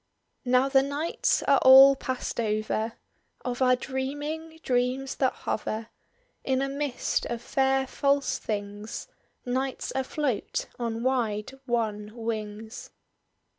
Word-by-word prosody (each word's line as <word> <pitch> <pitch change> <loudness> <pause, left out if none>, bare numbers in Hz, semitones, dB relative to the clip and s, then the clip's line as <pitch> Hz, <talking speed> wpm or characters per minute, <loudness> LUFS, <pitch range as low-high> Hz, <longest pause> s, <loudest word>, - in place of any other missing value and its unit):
"Now 255 +2 +4
the 270 -1 +5
nights 285 +4 0
are 280 -1 +4
all 270 +1 +9
past 260 -2 -4
over 215 0 -1 0.5
Of 250 0 -3
our 255 -1 +5
dreaming, 290 +5 -4
dreams 255 +2 0
that 260 -2 +2
hover 220 +1 -4 0.5
In 265 0 +1
a - - 0
mist 280 -2 -1
of 235 - -3
fair 270 0 +2
false 280 +1 +1
things: 205 0 -5 0.4
Night's 260 +2 -2
afloat 265 -3 -1
on 230 -1 -2
wide 230 -5 0 0.2
wan 215 -3 -1
wings." 220 -1 -5
255 Hz, 115 wpm, -27 LUFS, 225-270 Hz, 0.5 s, all